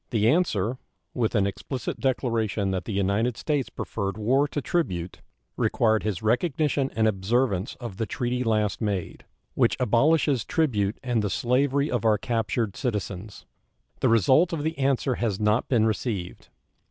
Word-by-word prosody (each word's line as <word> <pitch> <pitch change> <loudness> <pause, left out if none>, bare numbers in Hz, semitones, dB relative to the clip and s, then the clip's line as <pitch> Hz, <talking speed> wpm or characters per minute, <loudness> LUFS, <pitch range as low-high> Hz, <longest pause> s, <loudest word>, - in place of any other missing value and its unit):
The 110 -2 +2
answer, 125 - +1 0.3
with 115 -2 0
an 100 -2 +3
explicit 125 +6 -4
declaration 115 -6 0
that 95 -1 -2
the - - -4
United 100 +4 0
States 145 -4 -1
preferred 100 -2 -4
war 130 +7 +2
to 145 - -3
tribute, 90 - -2 0.4
required 110 -2 +2
his 105 -1 -3
recognition 140 +3 +1
and 110 0 +3
observance 105 0 0
of 120 -7 -8
the 115 - -2
treaty 125 -3 -2
last 110 -2 0
made, 100 -5 -3 0.3
which - - +2
abolishes 130 +1 +3
tribute 110 -10 0
and 120 -3 0
the 105 - -1
slavery 135 +7 +1
of 120 -4 -1
our 110 -2 +4
captured 115 -1 -1
citizens. 105 -5 -4 0.5
The - - +2
result 130 - +4
of 155 -3 -2
the 160 +1 -1
answer 135 -1 +1
has 110 -5 0
not 105 +2 +1
been 115 -4 +3
received. 105 -4 -3
115 Hz, 155 wpm, -26 LUFS, 105-130 Hz, 0.5 s, our